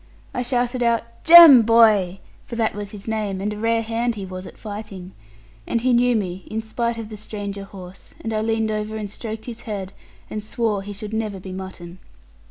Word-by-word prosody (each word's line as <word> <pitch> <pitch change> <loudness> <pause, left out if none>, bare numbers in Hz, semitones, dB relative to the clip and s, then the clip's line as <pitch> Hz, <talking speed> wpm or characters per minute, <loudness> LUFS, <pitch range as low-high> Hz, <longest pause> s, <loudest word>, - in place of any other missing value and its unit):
I 250 - -2
shouted 245 0 -1
out, 235 -1 +2 0.2
'Jem, 330 -6 +11
boy!' 215 -5 +4 0.2
for 235 - -8
that 225 -1 0
was 205 0 -6
his 200 0 -10
name, 210 -3 -2
and 210 +2 -2
a - - -7
rare 225 +1 +1
hand 230 +1 -1
he 200 -2 -6
was 185 0 -7
at - - -13
fighting 205 -4 -8 0.6
and 230 - 0
he 255 +1 +2
knew 245 0 +3
me 185 -3 -3
in 220 - -3
spite 235 +1 -2
of 225 -2 -6
the 215 - -8
stranger 200 -1 -6
horse; 190 -1 -12
and 225 - -4
I 215 - 0
leaned 225 0 0
over 215 0 -3
and 210 -1 -4
stroked 220 +1 -7
his 235 -1 -8
head, 195 -2 -5 0.3
and 215 - -5
swore 220 -2 -1
he 205 +1 -8
should 210 +1 -7
never 215 -3 -2
be 185 0 -9
mutton. 185 -2 -8
215 Hz, 205 wpm, -22 LUFS, 200-230 Hz, 0.6 s, Jem